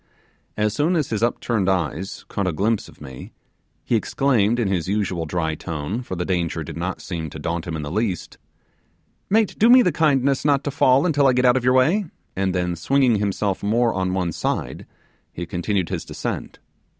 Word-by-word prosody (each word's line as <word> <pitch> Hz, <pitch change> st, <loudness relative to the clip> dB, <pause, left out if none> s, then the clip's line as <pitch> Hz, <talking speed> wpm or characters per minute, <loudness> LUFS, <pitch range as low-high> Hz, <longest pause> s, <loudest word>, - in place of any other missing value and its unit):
As 105 Hz, -1 st, +1 dB
soon 155 Hz, +7 st, +1 dB
as 155 Hz, -5 st, -1 dB
his 110 Hz, -2 st, -1 dB
upturned 115 Hz, -4 st, 0 dB
eyes 90 Hz, 0 st, -2 dB
caught 100 Hz, -2 st, -2 dB
a -, -, +1 dB
glimpse 110 Hz, +6 st, -1 dB
of -, -, -19 dB
me, 65 Hz, -3 st, -10 dB, 0.5 s
he 120 Hz, -, 0 dB
exclaimed 115 Hz, -1 st, +2 dB
in 115 Hz, -, +1 dB
his 95 Hz, -3 st, -1 dB
usual 95 Hz, -5 st, -1 dB
dry 80 Hz, -1 st, -1 dB
tone, 80 Hz, +8 st, -4 dB
for 105 Hz, -7 st, -6 dB
the 90 Hz, 0 st, -3 dB
danger 85 Hz, -3 st, -1 dB
did 80 Hz, +2 st, -8 dB
not 90 Hz, +3 st, -3 dB
seem 80 Hz, -4 st, -4 dB
to -, -, -9 dB
daunt 85 Hz, +1 st, -3 dB
him 85 Hz, -, -3 dB
in 75 Hz, -, -4 dB
the 75 Hz, -, -5 dB
least, 100 Hz, -2 st, -2 dB, 0.9 s
'Mate, 215 Hz, 0 st, +2 dB
do 225 Hz, -, +5 dB
me 250 Hz, +1 st, +8 dB
the 180 Hz, -, +2 dB
kindness 140 Hz, -3 st, +2 dB
not 145 Hz, -1 st, +2 dB
to 145 Hz, -, -2 dB
fall 130 Hz, +3 st, +4 dB
until 145 Hz, -5 st, +3 dB
I 130 Hz, -, +4 dB
get 125 Hz, +1 st, +2 dB
out 125 Hz, 0 st, +5 dB
of 130 Hz, -, 0 dB
your 125 Hz, +1 st, +4 dB
way;' 165 Hz, +11 st, +3 dB, 0.3 s
and 95 Hz, -1 st, 0 dB
then 90 Hz, -1 st, -1 dB
swinging 125 Hz, +6 st, +2 dB
himself 100 Hz, -1 st, -1 dB
more 115 Hz, +3 st, +2 dB
on 95 Hz, 0 st, -1 dB
one 90 Hz, -3 st, -1 dB
side, -, -, -3 dB, 0.4 s
he 85 Hz, -, -5 dB
continued 90 Hz, +1 st, -2 dB
his -, -, -3 dB
descent. -, -, -5 dB
100 Hz, 200 wpm, -22 LUFS, 90-130 Hz, 0.9 s, me